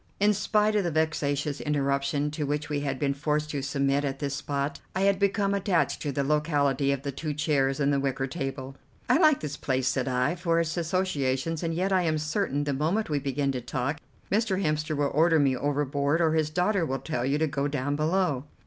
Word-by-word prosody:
In 205 Hz, +1 st, +4 dB
spite 210 Hz, +1 st, +1 dB
of 205 Hz, -, +2 dB
the 175 Hz, -, 0 dB
vexatious 150 Hz, -2 st, -1 dB
interruption 140 Hz, 0 st, 0 dB
to 150 Hz, -1 st, -3 dB
which 145 Hz, +1 st, -2 dB
we 145 Hz, -1 st, -1 dB
had 140 Hz, -2 st, -2 dB
been 140 Hz, +1 st, 0 dB
forced 150 Hz, +2 st, -1 dB
to 140 Hz, -, -2 dB
submit 140 Hz, 0 st, 0 dB
at 135 Hz, -1 st, -2 dB
this 140 Hz, -1 st, -3 dB
spot, 140 Hz, 0 st, -3 dB, 0.2 s
I 190 Hz, -, 0 dB
had 195 Hz, -1 st, +3 dB
become 200 Hz, 0 st, +1 dB
attached 195 Hz, -3 st, +1 dB
to 145 Hz, -, -2 dB
the 140 Hz, +1 st, -1 dB
locality 145 Hz, -2 st, +1 dB
of 140 Hz, -1 st, -2 dB
the 140 Hz, -, -2 dB
two 150 Hz, +2 st, -4 dB
chairs 140 Hz, -3 st, +1 dB
and 145 Hz, 0 st, +2 dB
the 140 Hz, -, +2 dB
wicker 135 Hz, -1 st, -1 dB
table. 135 Hz, -2 st, -5 dB, 0.3 s
"I -, -, +4 dB
like 310 Hz, -5 st, +5 dB
this 150 Hz, -1 st, -4 dB
place," 130 Hz, -1 st, -1 dB
said 130 Hz, 0 st, 0 dB
I, 125 Hz, +3 st, +1 dB
"for 170 Hz, -2 st, 0 dB
its 165 Hz, 0 st, -1 dB
associations, 165 Hz, -4 st, -1 dB
and 165 Hz, -1 st, -1 dB
yet 185 Hz, +4 st, 0 dB
I 185 Hz, -, +4 dB
am 160 Hz, -3 st, +1 dB
certain, 155 Hz, -1 st, -1 dB
the 145 Hz, -1 st, -1 dB
moment 160 Hz, +8 st, 0 dB
we 145 Hz, -, +1 dB
begin 140 Hz, 0 st, -1 dB
to 130 Hz, -2 st, -3 dB
talk, 130 Hz, +5 st, -2 dB, 0.3 s
Mr. 205 Hz, -2 st, +1 dB
Hemster 155 Hz, -3 st, -1 dB
will 145 Hz, -1 st, +1 dB
order 160 Hz, +2 st, +4 dB
me 140 Hz, -3 st, +3 dB
overboard, 145 Hz, +2 st, 0 dB
or 165 Hz, -2 st, +3 dB
his 155 Hz, -2 st, +1 dB
daughter 180 Hz, +4 st, +1 dB
will 135 Hz, -4 st, -1 dB
tell 135 Hz, -4 st, -3 dB
you 135 Hz, +3 st, +1 dB
to 160 Hz, -, +2 dB
go 140 Hz, -1 st, -1 dB
down 145 Hz, 0 st, -1 dB
below." 155 Hz, -3 st, 0 dB
145 Hz, 220 wpm, -27 LUFS, 140-165 Hz, 0.3 s, like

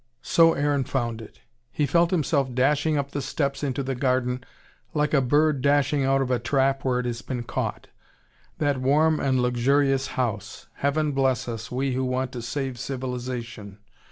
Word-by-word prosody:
So 165 Hz, -1 st, +5 dB
Aaron 145 Hz, -1 st, +1 dB
found 120 Hz, -4 st, -2 dB
it. 110 Hz, -, -14 dB, 0.3 s
He 150 Hz, -, 0 dB
felt 170 Hz, +4 st, +3 dB
himself 140 Hz, -7 st, 0 dB
dashing 145 Hz, +4 st, +2 dB
up 140 Hz, -1 st, -2 dB
the 145 Hz, -, -3 dB
steps 140 Hz, 0 st, -2 dB
into 140 Hz, -1 st, -1 dB
the 135 Hz, 0 st, -2 dB
garden 125 Hz, -1 st, 0 dB, 0.5 s
like 150 Hz, 0 st, +1 dB
a 140 Hz, -, +5 dB
bird 145 Hz, +2 st, +2 dB
dashing 145 Hz, 0 st, +2 dB
out 135 Hz, 0 st, +2 dB
of 130 Hz, -, -3 dB
a 125 Hz, -, +2 dB
trap 135 Hz, +2 st, +1 dB
where 130 Hz, -2 st, +1 dB
it 125 Hz, -, -3 dB
has 120 Hz, -1 st, -3 dB
been 125 Hz, -3 st, -4 dB
caught: -, -, -3 dB, 0.7 s
that 145 Hz, -3 st, 0 dB
warm 150 Hz, +4 st, +3 dB
and 130 Hz, -2 st, +1 dB
luxurious 135 Hz, +2 st, +2 dB
house. 105 Hz, -5 st, -3 dB
Heaven 150 Hz, +2 st, 0 dB
bless 135 Hz, -2 st, +1 dB
us, 115 Hz, 0 st, -6 dB
we 130 Hz, +1 st, -1 dB
who 130 Hz, +1 st, -1 dB
want 130 Hz, 0 st, -1 dB
to 125 Hz, -, -6 dB
save 125 Hz, +1 st, -4 dB
civilisation. 125 Hz, -5 st, -5 dB
135 Hz, 175 wpm, -25 LUFS, 125-145 Hz, 0.7 s, So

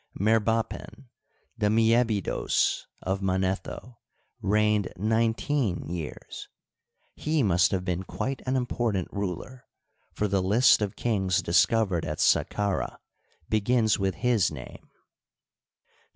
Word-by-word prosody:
Merbapen, 115 Hz, +4 st, 0 dB, 0.5 s
the 105 Hz, -, +2 dB
Aliebidos 115 Hz, -1 st, +1 dB, 0.2 s
of 95 Hz, +1 st, -2 dB
Manetho, 95 Hz, +5 st, -2 dB, 0.4 s
reigned 105 Hz, 0 st, +1 dB
nineteen 110 Hz, +1 st, 0 dB
years. 85 Hz, -3 st, -7 dB, 0.7 s
He 155 Hz, -2 st, 0 dB
must 90 Hz, -4 st, +3 dB
have 95 Hz, -2 st, -2 dB
been 90 Hz, -1 st, -1 dB
quite 135 Hz, +7 st, -4 dB
an 130 Hz, -, +1 dB
important 120 Hz, -7 st, -1 dB
ruler, 100 Hz, +7 st, -5 dB, 0.5 s
for 105 Hz, -, -1 dB
the 100 Hz, -1 st, +1 dB
list 105 Hz, +6 st, +4 dB
of 100 Hz, -2 st, -2 dB
kings 95 Hz, -6 st, 0 dB
discovered 95 Hz, 0 st, +2 dB
at 75 Hz, 0 st, -4 dB
Saqqarah 100 Hz, -2 st, +1 dB, 0.5 s
begins 110 Hz, 0 st, +2 dB
with 95 Hz, -2 st, 0 dB
his 120 Hz, -6 st, +2 dB
name. -, -, -10 dB
105 Hz, 105 wpm, -27 LUFS, 95-115 Hz, 0.7 s, list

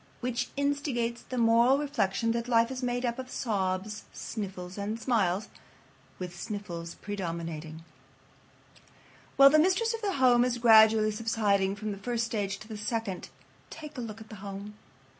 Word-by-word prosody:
Which 250 Hz, 0 st, -2 dB
instigates 280 Hz, -5 st, -1 dB
the 255 Hz, -, -6 dB
moral 235 Hz, +3 st, +5 dB
reflection 230 Hz, -7 st, 0 dB
that 235 Hz, +1 st, -2 dB
life 230 Hz, 0 st, +3 dB
is 260 Hz, 0 st, -4 dB
made 245 Hz, 0 st, -1 dB
up 235 Hz, +1 st, -2 dB
of 255 Hz, 0 st, -6 dB
sobs, 205 Hz, -2 st, -2 dB
sniffles, 185 Hz, -4 st, -6 dB
and 210 Hz, +2 st, -3 dB
smiles, 210 Hz, -5 st, +1 dB, 0.7 s
with 180 Hz, -1 st, -6 dB
sniffles 175 Hz, -4 st, -6 dB
predominating. 165 Hz, -5 st, -5 dB, 1.5 s
While 275 Hz, 0 st, +8 dB
the 310 Hz, -, +6 dB
mistress 380 Hz, +8 st, +2 dB
of 455 Hz, -, -5 dB
the 405 Hz, -2 st, -1 dB
home 250 Hz, -5 st, +5 dB
is 250 Hz, -1 st, 0 dB
gradually 220 Hz, -2 st, +6 dB
subsiding 210 Hz, -3 st, +1 dB
from 215 Hz, +1 st, -4 dB
the 200 Hz, -, -6 dB
first 235 Hz, +2 st, -1 dB
stage 205 Hz, -4 st, -2 dB
to 215 Hz, -, -10 dB
the 220 Hz, -2 st, -7 dB
second, 210 Hz, -3 st, -3 dB, 0.4 s
take 305 Hz, -2 st, -9 dB
a 250 Hz, -, -4 dB
look 220 Hz, -2 st, -7 dB
at 220 Hz, -, -12 dB
the 215 Hz, -, -9 dB
home. 200 Hz, +1 st, -7 dB
225 Hz, 160 wpm, -29 LUFS, 200-245 Hz, 1.5 s, While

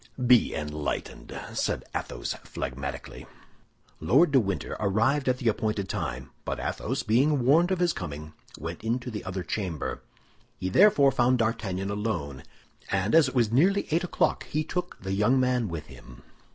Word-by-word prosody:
"Be 125 Hz, -1 st, +5 dB
enlightened!" 75 Hz, -1 st, -4 dB
said -, -, -1 dB
Athos, -, -, -3 dB
phlegmatically. 70 Hz, +2 st, -6 dB, 0.7 s
Lord 135 Hz, -, +4 dB
de 135 Hz, -, +6 dB
Winter 100 Hz, -4 st, -2 dB
arrived 115 Hz, +7 st, +2 dB
at 125 Hz, -, +2 dB
the 125 Hz, -, -3 dB
appointed 105 Hz, -3 st, 0 dB
time; 65 Hz, +2 st, -4 dB
but -, -, -3 dB
Athos, -, -, -2 dB
being 130 Hz, +4 st, +2 dB
warned 165 Hz, +7 st, +5 dB
of 190 Hz, -, +1 dB
his 175 Hz, -1 st, +2 dB
coming, 75 Hz, -2 st, -6 dB, 0.2 s
went 80 Hz, +5 st, -6 dB
into 120 Hz, +2 st, -2 dB
the 105 Hz, -, -5 dB
other 95 Hz, -1 st, -4 dB
chamber. 90 Hz, -8 st, -3 dB, 0.6 s
He 95 Hz, -, -2 dB
therefore 145 Hz, -, +6 dB
found 125 Hz, 0 st, +3 dB
D'Artagnan 100 Hz, -4 st, -1 dB
alone, 90 Hz, -11 st, -3 dB, 0.5 s
and 95 Hz, +2 st, 0 dB
as 160 Hz, -3 st, +6 dB
it 130 Hz, -, -10 dB
was 115 Hz, -4 st, +2 dB
nearly 190 Hz, +11 st, +3 dB
eight 165 Hz, +3 st, +2 dB
o'clock 180 Hz, -, 0 dB
he 155 Hz, +1 st, -1 dB
took 180 Hz, +2 st, -4 dB
the 95 Hz, 0 st, -2 dB
young 105 Hz, +7 st, +3 dB
man 125 Hz, -3 st, +1 dB
with 85 Hz, -4 st, -5 dB
him. 65 Hz, -4 st, -14 dB
110 Hz, 160 wpm, -27 LUFS, 90-135 Hz, 0.7 s, de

